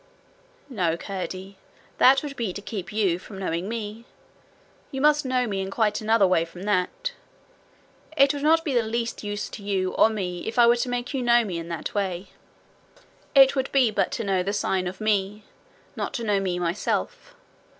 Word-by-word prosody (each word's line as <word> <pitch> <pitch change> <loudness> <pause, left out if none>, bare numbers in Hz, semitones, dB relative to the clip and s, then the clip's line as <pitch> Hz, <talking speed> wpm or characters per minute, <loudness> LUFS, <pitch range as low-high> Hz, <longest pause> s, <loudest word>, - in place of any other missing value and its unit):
'No, 180 - -1
Curdie; 190 +1 -6 0.4
that 270 +2 +6
would 285 -2 -6
be 225 -8 -2
to 205 - -6
keep 205 -5 -6
you 195 -5 +1
from 195 +1 -11
knowing 185 0 -3
me. 225 0 -5 0.8
You 270 - -5
must 295 0 +3
know 255 -1 +1
me 195 -4 -2
in 190 - -4
quite 210 0 0
another 220 -1 +4
way 180 -3 +3
from 175 +2 -10
that. 205 - -1 1.1
It 275 0 +5
would 285 - -5
not 325 +3 +3
be 290 - -1
the 240 - +4
least 230 +1 -3
use 205 0 -3
to - - -9
you 195 -2 -1
or - - +5
me 185 -5 -3
either - - -8
if 225 - -8
I 240 - +7
were 235 +1 +6
to 245 - -2
make 245 +2 -3
you 265 - -1
know 240 -1 +4
me 180 -5 -3
in 165 - -7
that 170 -1 -5
way. 190 -2 -2 1.1
It 270 0 +7
would 265 0 -1
be 260 -5 +4
but 200 -3 +1
to 230 - -2
know 195 -3 +1
the 195 +3 -2
sign 190 -3 0
of 185 +3 -7
Me 210 -1 0 0.5
not - - -4
to 235 - -3
know 205 -3 +2
me 185 -2 -1
myself. 210 - -2
210 Hz, 200 wpm, -25 LUFS, 190-245 Hz, 1.1 s, I